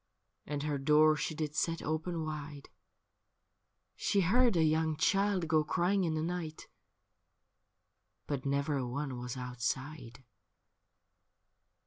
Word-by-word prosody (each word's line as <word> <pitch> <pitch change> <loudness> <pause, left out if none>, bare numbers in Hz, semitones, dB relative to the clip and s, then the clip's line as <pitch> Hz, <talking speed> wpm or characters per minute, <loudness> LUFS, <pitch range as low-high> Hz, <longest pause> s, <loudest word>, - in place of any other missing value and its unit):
And 145 0 -3
her 150 -2 -1
door 155 +2 +5
she 150 +1 -3
did 155 -1 -3
set 165 +2 -1
open 160 +1 -2
wide: 150 -2 -6 1.3
She 200 - +1
heard 235 +5 +4
a 165 - +4
young 160 0 +2
child 195 0 +2
go 155 -1 +3
crying 180 +5 +1
in 160 -2 0
the 155 - -1
night, 165 -2 -4 1.6
But 140 -3 -3
never 140 +1 0
a 130 -2 -2
one 135 0 -4
was 125 +1 -5
outside. 125 +1 -4
155 Hz, 120 wpm, -32 LUFS, 140-165 Hz, 1.6 s, door